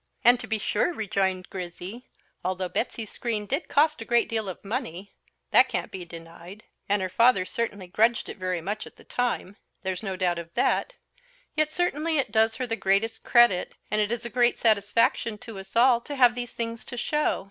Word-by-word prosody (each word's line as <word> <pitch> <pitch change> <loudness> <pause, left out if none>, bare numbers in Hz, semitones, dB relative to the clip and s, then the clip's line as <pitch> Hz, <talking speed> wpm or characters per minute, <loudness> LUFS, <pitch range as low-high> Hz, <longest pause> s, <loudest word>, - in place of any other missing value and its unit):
"And, 245 +1 +6
to - - -7
be 220 - 0
sure," 210 - 0
rejoined 190 - -1
Grizzy, 185 +5 -6 0.4
"although 185 0 -1
Betsy's 225 0 -3
screen 220 -4 -2
did 275 - -2
cost 305 -2 +3
a - - -3
great 235 +1 +3
deal 220 -3 -2
of 185 - -9
money 195 -4 -4 0.4
that - - +6
can't - - -3
be 185 -2 -6
denied; 170 +4 -11 0.3
and 205 -1 +2
her - - 0
father 190 +1 +4
certainly 205 -3 -3
grudged 220 +5 +2
it - - -7
very 185 -2 -2
much 205 +5 -4
at - - -14
the - - -17
time 240 -5 -2 0.3
there's 185 -1 -2
no 195 -3 -3
doubt 180 -2 0
of 170 0 -9
that; - - +1 0.6
yet 310 0 +2
certainly 325 -2 0
it 265 -6 0
does 220 0 +3
her 255 - -2
the 225 -2 -2
greatest 200 +2 +1
credit, 240 -7 +4 0.2
and 210 0 +2
it 210 +1 0
is 235 0 -3
a - - -3
great 245 0 +3
satisfaction 225 +1 +2
to 215 -2 -9
us 195 +2 -12
all 240 0 +5
to 290 +4 -6
have 245 -3 +6
these 245 0 -6
things 230 -1 -4
to 245 - -7
show. 300 +5 0
220 Hz, 200 wpm, -26 LUFS, 190-240 Hz, 0.6 s, And